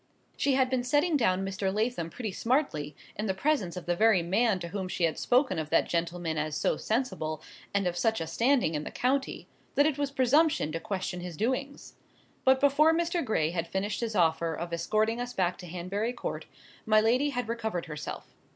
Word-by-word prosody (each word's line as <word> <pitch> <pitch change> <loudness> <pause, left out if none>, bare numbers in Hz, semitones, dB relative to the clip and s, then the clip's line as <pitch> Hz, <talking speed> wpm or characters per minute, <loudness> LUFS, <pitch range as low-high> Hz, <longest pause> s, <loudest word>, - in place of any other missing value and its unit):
She 275 -2 +1
had 260 -1 +3
been 255 -1 +1
setting 295 +6 +2
down 195 -8 +2
Mr. 195 0 -2
Lathom 215 -5 -1
pretty 215 +5 -5
smartly, 185 - -1 0.2
in 210 +2 -3
the 190 - 0
presence 200 - 0
of 180 - -6
the 175 - 0
very 215 -2 +4
man 200 +4 +2
to 170 - -5
whom 190 0 -3
she 180 - -3
had 165 -1 +1
spoken 245 - +2
of 155 -1 -4
that 165 - +3
gentleman 170 -1 -1
as 155 -1 -2
so - - +1
sensible, 185 - -2 0.3
and 200 -1 0
of 175 -1 0
such 220 +4 +1
a 165 - -2
standing 240 - +2
in 150 -1 -2
the - - -5
county, 265 +2 -1 0.3
that 285 - +5
it 300 -2 0
was 285 -1 0
presumption 275 - +2
to 165 - -3
question 190 -3 -4
his 175 -3 -7
doings. 260 +5 -3 0.5
But 265 0 +5
before 290 +3 +4
Mr. 340 +1 0
Gray 165 - 0
had 170 -1 -2
finished 195 +5 -2
his 225 -2 -2
offer 165 -2 +2
of 170 +1 -5
escorting 215 +7 0
us 245 0 -5
back 180 -3 0
to 180 - -9
Hanbury 185 +7 -3
Court, - - -5 0.4
my 215 0 +4
lady 245 +7 +2
had 245 -4 -3
recovered 220 -6 -3
herself. 150 -2 -7
210 Hz, 205 wpm, -29 LUFS, 170-255 Hz, 0.5 s, that